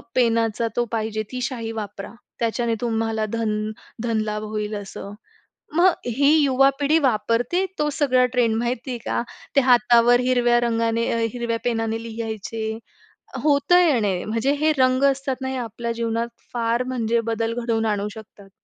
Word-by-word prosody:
पेनाचा 230 -2 +2
तो 240 - +1
पाहिजे. 220 -1 -2
ती 255 -1 -4
शाई 235 -3 -3
वापरा. 205 -2 -6 0.3
त्याच्याने 230 0 0
तुम्हाला 225 -2 -1
धन 215 -2 -1 0.3
धन 230 -2 0
लाभ 210 0 -3
होईल, 215 0 -3
असं. 200 0 -7 0.6
मग 360 +2 +6 0.2
ही 275 +4 +3
युवा 270 -1 +4
पिढी 295 +3 +3
वापरते, 235 - 0
तो 300 - +1
सगळा 255 -4 +3
ट्रेंड 240 -3 +2
माहिती 240 +2 -2
आहे 245 - -3
का? - - -1 0.3
ते - - +8
हातावर 245 -1 +5
हिरव्या 245 -1 +3
रंगाने, 230 -1 0
अ, 230 - 0
हिरव्या 235 -2 -2
पेनाने 225 -1 -1
लिहायचे. 220 -1 -4 0.6
होतं 300 +4 +4
येणं 220 - +2
म्हणजे 230 +5 +1
हे 310 0 +4
रंग 255 0 +3
असतात 275 -1 +1
ना, 265 - -3
हे 265 - -3
आपल्या 235 -1 -4
जीवनात 230 0 -2 0.2
फार 235 0 0
म्हणजे 235 -2 0
बदल 225 0 -1
घडवून 225 -2 0
आणू 210 -1 -1
शकतात. 210 -2 -13
230 Hz, 155 wpm, -23 LUFS, 225-255 Hz, 0.6 s, ते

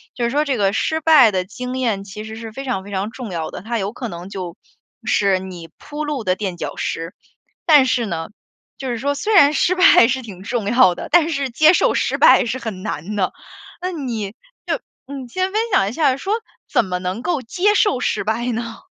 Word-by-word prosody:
就 245 - -3
是 - - +1
说 295 +4 +1
这 275 -5 -1
个 200 0 +2
失 315 +7 0
败 295 -8 +6
的 185 -1 -1
经 250 +5 -6
验， 225 -6 -1
其 205 +2 -8
实 220 0 -8
是 225 -1 -8
非 270 +4 -7
常 220 -7 -2
非 205 - -11
常 195 +2 -2
重 245 -6 -7
要 165 -2 -3
的， - - -7
它 230 +3 -3
有 200 +2 -3
可 245 - -5
能 175 +1 -8
就 185 -3 -6 0.5
是 195 -2 +2
你 180 -3 -9
铺 295 +1 -6
路 295 -6 -3
的 185 -2 +1
垫 190 -3 -4
脚 - - -5
石。 165 +3 -4 0.5
但 295 -5 +6
是 250 -2 +1
呢， 165 -5 -4 0.5
就 265 - -5
是 240 - -2
说 280 +5 -1
虽 425 +9 -1
然 295 -6 +7
失 360 +5 +2
败 365 -10 +7
是 260 +1 -1
挺 195 -6 -10
重 230 -1 -2
要 230 -6 +5
的， - - -7
但 335 -2 +5
是 280 -4 -1
接 310 +7 +5
受 - - +3
失 - - 0
败 - - +6
是 240 +3 -2
很 215 -6 -6
难 210 +1 -4
的， 190 -3 0 0.5
那 365 - -2
你 235 - -4 0.3
就 - - 0 0.3
嗯， 270 -2 -7
先 370 +7 -1
分 435 - +2
享 195 - +4
一 220 - -7
下， 275 -4 +2
说 385 +9 -2 0.4
怎 - - +3
么 180 -1 -3
能 185 +5 -4
够 315 +1 -1
接 375 - +1
受 395 - +3
失 - - -1
败 220 +4 -1
呢？ 230 0 -4
235 Hz, 245 characters per minute, -20 LUFS, 195-280 Hz, 0.5 s, 然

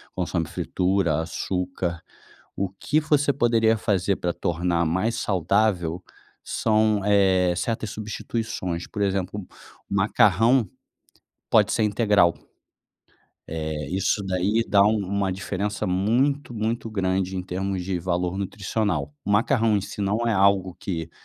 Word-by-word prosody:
consome 85 -2 -1
fritura, 90 -4 0
açúcar. 90 0 -3 0.5
O 100 -1 -1
que 145 +10 0
você 145 -2 +2
poderia 115 -3 +3
fazer 100 -3 0
pra 90 - -1
tornar 85 0 0
mais 95 +8 0
saudável, 90 -3 0 0.4
são, 110 -2 +1
eh, 95 -3 +3
certas 110 +2 -2
substituições 105 -4 -4
por 105 - -5
exemplo, 100 0 -2 0.4
macarrão 105 +3 +3 0.8
pode - - +4
ser - - +1
integral, 105 -5 +3 1.1
eh, 80 -2 -4
isso 95 +2 0
daí 95 +5 +1
dá 100 -1 +5
uma 100 -2 +1
diferença 100 +2 -3
muito, 120 +9 +1
muito 115 +2 -2
grande 95 -2 -1
em 90 - -2
termos 95 0 -3
de 95 -1 -2
valor 90 +1 -1
nutricional, 95 -6 -2
o 100 - -3
macarrão 110 0 +3
em - - +1
si 100 - -7
não 100 +2 0
é 115 - +2
algo 95 -2 +2
que 85 -4 -4
100 Hz, 125 wpm, -24 LUFS, 90-110 Hz, 1.1 s, dá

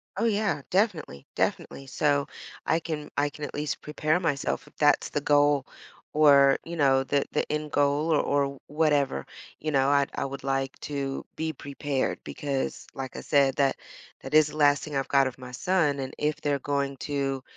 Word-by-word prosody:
Oh, 210 +5 0
yeah, 205 -9 +1
definitely, 180 - 0
definitely, 135 - -2
so, 145 +1 +1 0.4
I 160 - +3
can 155 -2 -5
I 145 0 +2
can 150 0 -6
at - - -8
least 150 0 -3
prepare 155 +2 0
myself 140 -5 -1
if - - -19
that's 145 -1 +3
the 145 - -2
goal 145 -1 +3 0.5
or, 140 -2 +6
you 170 - -6
know, 135 -4 +3
the 140 +1 0
the - - -1
end 150 0 -2
goal 145 +3 +2
or 150 - +4
or 140 -1 0
whatever, 145 - +1 0.3
you 155 0 -2
know, 135 -1 +3
I 140 -1 +4
I - - -2
would 135 0 -6
like 135 -1 -1
to 140 -2 -4
be 160 0 -2
prepared 140 -2 -3
because, 140 -3 -3
like 135 -2 -6
I - - -5
said, 140 -2 +3
that 135 -1 +2 0.4
that 135 +3 -4
is 155 -1 +7
the 155 - -9
last 145 -1 +4
thing 150 -2 -6
I've 135 - -1
got 140 -1 +4
of 130 -1 -5
my 125 -1 -9
son, 150 +1 +1
and 130 -1 -4
if 150 0 0
they're 145 -1 0
going 140 -1 -2
to 135 -2 -2
145 Hz, 190 wpm, -27 LUFS, 135-150 Hz, 0.5 s, is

